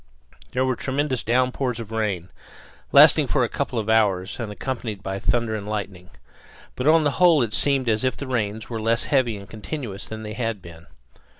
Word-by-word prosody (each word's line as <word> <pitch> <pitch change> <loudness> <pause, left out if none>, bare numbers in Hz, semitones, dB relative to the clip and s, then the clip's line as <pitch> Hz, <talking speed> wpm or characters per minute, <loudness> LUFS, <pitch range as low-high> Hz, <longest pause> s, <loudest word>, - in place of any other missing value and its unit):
There 130 +1 +1
were 130 -1 0
tremendous 135 0 -1
downpours 125 +1 0
of 110 -1 -7
rain, 100 -6 -2 0.6
lasting - - +7
for - - +2
a - - +1
couple - - -3
of 110 -2 -2
hours 105 -3 +1
and 115 -3 -4
accompanied 110 -2 -5
by 95 0 -3
thunder 115 +3 0
and 105 -2 -4
lightning. 95 -4 -5 0.7
But 125 - -2
on 160 0 +6
the 145 - +2
whole 165 -7 +6
it 110 -2 -4
seemed 135 +2 +1
as 110 +1 +1
if 130 - 0
the 140 - -5
rains 110 -4 -2
were 115 -2 -4
less 115 +2 +1
heavy 125 -6 +1
and 100 -1 -11
continuous 110 - -6
than 110 0 -7
they 105 0 -6
had 115 -2 -2
been. 85 -2 -13
110 Hz, 195 wpm, -23 LUFS, 105-130 Hz, 0.7 s, lasting